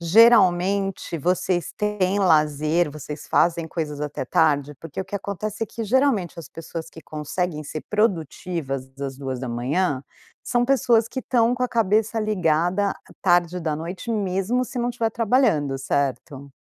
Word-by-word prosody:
Geralmente 195 -2 +4
vocês 175 +2 0
têm 205 -2 0
lazer? 155 -2 +2
Vocês 150 0 -8
fazem 170 -1 +2
coisas 155 -3 -4
até 150 -3 -3
tarde? 145 -1 +2
Porque 165 +5 -7
o 190 - -3
que 190 - -9
acontece 200 +2 -4
é - - 0
que 225 +3 -5
geralmente 225 - +1
as 165 - -8
pessoas 165 0 -7
que 160 - -12
conseguem 155 +1 -3
ser 155 +1 -6
produtivas 165 - -1
às 135 -1 -4
2h, 130 +3 -1 0.4
são 240 0 +1
pessoas 235 -4 +3
que 260 - -4
estão 240 -1 +2
com 250 - -3
a 250 - +1
cabeça 220 0 +1
ligada 185 -1 +1 0.3
tarde 175 -1 +3
da 160 -3 -1
noite, 175 +8 -6
mesmo 205 +4 0
se 250 - -6
não 240 0 0
tiver 230 -2 -1
trabalhando, 215 - +2
certo? 140 0 -2
180 Hz, 150 wpm, -23 LUFS, 150-215 Hz, 0.4 s, Geralmente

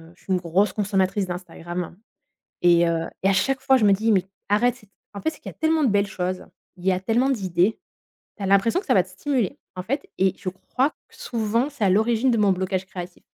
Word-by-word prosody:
je - - -25
suis 190 - -6
une 180 - +3
grosse 185 +4 +1
consommatrice 195 -1 0
d'Instagram 175 0 -6 0.7
et 170 -1 +5
heu 165 -1 0 0.2
et 195 - +3
à 195 - +3
chaque 260 +8 +1
fois, 265 -1 +4
je 220 - +2
me 200 - +6
dis: 220 +3 +2
«Mais 185 -2 +3 0.2
arrête 235 +4 +2
c». 210 -4 -20 0.2
En 200 - -7
fait, - - -1
c'est 315 - -5
qu'il - - -7
y - - -15
a - - -43
tellement 320 0 +2
de 250 - +3
belles 200 0 +2
choses, 185 -1 -4 0.3
il 175 - -9
y 190 - +5
a 180 - 0
tellement 230 +7 +1
d'idées. 190 -4 +1 0.6
Tu 205 - -9
as - - -1
l'impression 200 - +3
que - - -17
ça - - +3
va - - +4
te - - -18
stimuler, 260 -9 -1 0.2
en 180 - -3
fait 280 - -3
et 190 -1 +3
je - - -6
crois 255 +9 -1
que - - -29
souvent, 230 +4 -1
c'est 270 -7 -3
à 195 - +4
l'origine 230 +5 +3
de - - +2
mon 205 -2 +4
blocage 190 0 -1
créatif. 180 -1 -8
200 Hz, 245 wpm, -24 LUFS, 185-240 Hz, 0.7 s, me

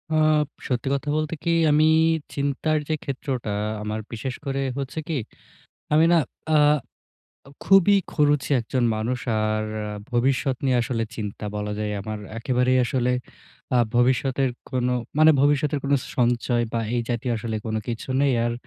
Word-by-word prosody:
Up 155 -1 +3 0.2
সত্যি 125 +1 -2
কথা 140 +1 -2
বলতে 155 +1 -2
কি, 170 - -1 0.2
আমি 155 +1 +4 0.5
চিন্তার 145 +2 0
যে 155 - +2
ক্ষেত্রটা 130 -5 -3 0.3
আমার 105 +1 -3
বিশেষ 120 +3 -4
করে 135 0 -1 0.2
হচ্ছে 140 +3 -4
কি, 160 -4 -1 0.8
আমি 155 +2 +5
না 170 - +6 0.4
আ - - +6 1.1
খুবই 195 +1 +6 0.2
খরুচে 145 -2 +2
একজন 120 +2 -1
মানুষ। 120 +4 -2 0.2
আর 110 0 0 0.2
আ 105 - -5 0.2
ভবিষ্যৎ 130 +2 +1
নিয়ে 130 -2 +3
আসলে 115 -2 -2
চিন্তা 105 -1 -5
বলা 105 0 -3
যায়, 105 -1 -2
আমার 110 +1 -5 0.2
একেবারেই 125 +1 +2
আসলে 125 0 0 0.7
আ - - +5 0.2
ভবিষ্যতের 130 +2 +2 0.2
কোনো, 125 -1 0 0.3
মানে, 155 0 +8
ভবিষ্যতের 145 0 +2
কোনো 140 0 +3 0.2
সঞ্চয় 120 0 +1
বা 115 - 0
এই 120 - +1
জাতীয় 120 +1 -1
আসলে 110 0 -3
কোনো 110 0 -1
কিছু 115 +1 -4
নেই। 140 -2 +3
আর 120 - 0
130 Hz, 150 wpm, -24 LUFS, 120-145 Hz, 1.1 s, মানে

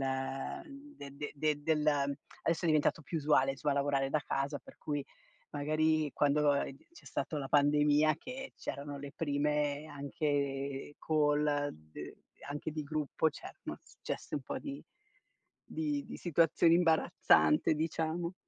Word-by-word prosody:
uhm, 135 - -4
de 140 -1 -8
de 145 +1 -5
de 150 0 0
del 155 -1 +1
adesso 145 +3 0
è - - +1
diventato 155 0 +3
più 160 +3 -3
usuale, 140 -2 +3
insomma, 145 +2 -1
lavorare 140 -1 +1
da 155 - +3
casa, 140 +1 -2
per - - -16
cui 145 -2 -2 0.5
magari, 155 +1 +1
quando, 145 0 +3
uhm, 140 -1 0 0.2
c'è - - -16
stato 145 +3 -3
la 135 -2 -3
pandemia 150 +1 +4
che 265 +5 -7
c'erano 140 0 -5
le 140 0 -7
prime 150 -1 0
anche 140 -1 -2
call, 150 -1 +2
d 75 -1 -10 0.4
anche 145 +2 -3
di 155 0 -3
gruppo, 155 +1 0
cer - - -10
noz - - -8
gesse - - -4
un 140 - -4
po' - - -4
di 280 -1 -6 0.8
di 295 -3 -2
di - - -7
situazioni 165 0 +4
imbarazzante, 165 -2 +4
diciamo. 165 +2 -1
150 Hz, 145 wpm, -33 LUFS, 140-160 Hz, 0.8 s, pandemia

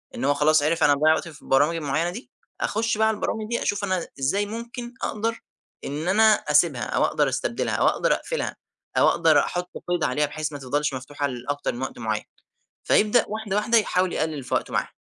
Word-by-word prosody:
إن 130 - -3
هو 145 - +4
خلاص 150 +1 +3
عرِف 165 +2 +1
أنا 145 - +6
باضيَّع 155 +2 +4
وقت 160 - -2
في 155 -3 -12
البرامج 145 +5 +2
معيّنة 155 +2 -1
دي. 225 +9 -9 0.3
أخش 220 +1 0
بقى 220 0 +3
البرامج 215 0 -3
دي، 235 - -1
أشوف 205 0 -1
أنا 185 -3 -1
إزاي 195 +10 +1
ممكن 235 +3 -7
أقدر 225 +2 -2 0.4
إن 150 +4 -4
أنا 215 +3 +5
أسيبها، - - +2
أو - - +1
أقدر - - +1
أستبدلها، - - -2
أو - - +3
أقدر - - +2
أقفلها، - - -3 0.4
أو - - +6
أقدر 160 -3 +4
أحط 180 +4 -2 0.2
قيد 175 -2 0
عليها، 150 - +1
بحيث 155 +1 -4
ما 145 - -7
تِفضَلش 145 +2 -1
مفتوحة 145 +3 -3
لأكتر 140 +3 -3
من 120 - -7
وقت 130 -2 -5
معيّن، 110 -2 -2 0.6
فيبدأ 215 +3 +4
واحدة، 215 -2 -3
واحدة، 230 +3 +3
يحاول 185 -4 +1
يقلِّل 155 -4 -2
في - - -3
وقته - - -1
معاها، - - -1
165 Hz, 200 wpm, -24 LUFS, 145-210 Hz, 0.6 s, أنا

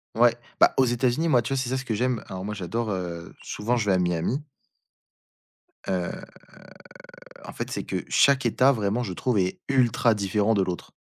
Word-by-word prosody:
Ouais, 120 +1 +5 0.2
bah, - - +6
aux 130 - +5
États-Unis, 125 +6 +1
moi, 125 -7 +3
tu 125 - -2
vois? - - 0
C'est 125 - -3
ça 130 - 0
ce 130 - -5
que 115 - -2
j'aime. 125 +1 -1
Alors 95 0 -6
moi, 105 +2 -4
j'adore, 110 +4 -3
heu 85 -3 -5
souvent 115 +4 -1
je 115 - -1
vais 100 - +3
à - - +2
Miami. 90 - -1 1.4
Heu, 90 -2 -1 1.3
en - - -8
fait, - - -5
c'est - - -4
que - - -4
chaque 135 -3 +4
État, 130 +4 +4
vraiment, 110 0 -1
je 100 -6 -4
trouve, 120 +4 0
est 95 -1 -1
ultra 120 -3 +3
différent 105 +2 +1
de 100 - +2
l'autre. 90 -1 -4
115 Hz, 195 wpm, -25 LUFS, 95-125 Hz, 1.4 s, bah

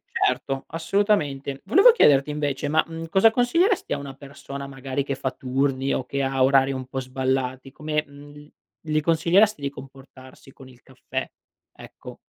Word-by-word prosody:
certo 135 0 -1
assolutamente. 160 -6 -1
Volevo 390 - +6
chiederti 145 - +4
invece 145 -1 -2
ma, 155 +2 +2
mhmm, 165 0 -7
cosa 190 +6 +5
consiglieresti 335 - +1
a - - -1
una 140 -1 -8
persona 140 0 -9
magari 135 0 -4
che 140 - -3
fa 135 0 -3
turni 135 +1 -1
o 130 - -2
che 140 +2 -3
ha 135 -1 0
orari 135 +1 +4
un 130 -1 -5
po' 130 +1 -4
sballati 130 0 -2
come, 150 +1 -2
mhmm, 145 +1 -14 0.3
gli 155 -1 -1
consiglieresti 170 +5 +3
di 140 - -2
comportarsi 135 -1 -14
con 130 0 -15
il 125 -1 -19
caffè, 130 0 -6 0.5
ecco? - - -12
140 Hz, 160 wpm, -23 LUFS, 135-155 Hz, 0.5 s, Volevo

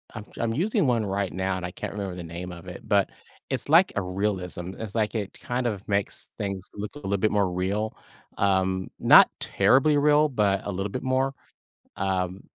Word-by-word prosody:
I'm 110 -1 -7
ju - - -6
I'm 115 -1 0
using 190 - +1
one 115 -4 +2
right 100 0 -1
now 95 0 -1
and 90 - -5
I 90 - -5
can't - - -6
remember 100 -3 -4
the 90 - -6
name 85 +2 -7
of 85 -1 -10
it, - - -8
but - - +3 0.4
it's - - -2
like 170 +4 +6
a 105 - +1
realism, 90 -1 -3
it's 110 -1 -6
like 110 0 0
it 100 -3 -4
kind 125 0 -2
of 100 -4 -4
makes 100 0 -2
things 100 -2 -4
look 105 +6 -6
a - - -8
little 100 -6 -1
bit 110 +2 +1
more 100 -3 +2
real, 100 +4 -1 0.4
um, 95 -1 +1
not - - +8
terribly 145 +3 +3
real, 150 +1 +4
but 100 -6 +1
a 100 - -2
little 95 +2 -3
bit - - -4
more. 130 +1 +1 0.6
Um, 95 -1 -1
100 Hz, 205 wpm, -26 LUFS, 95-115 Hz, 0.6 s, not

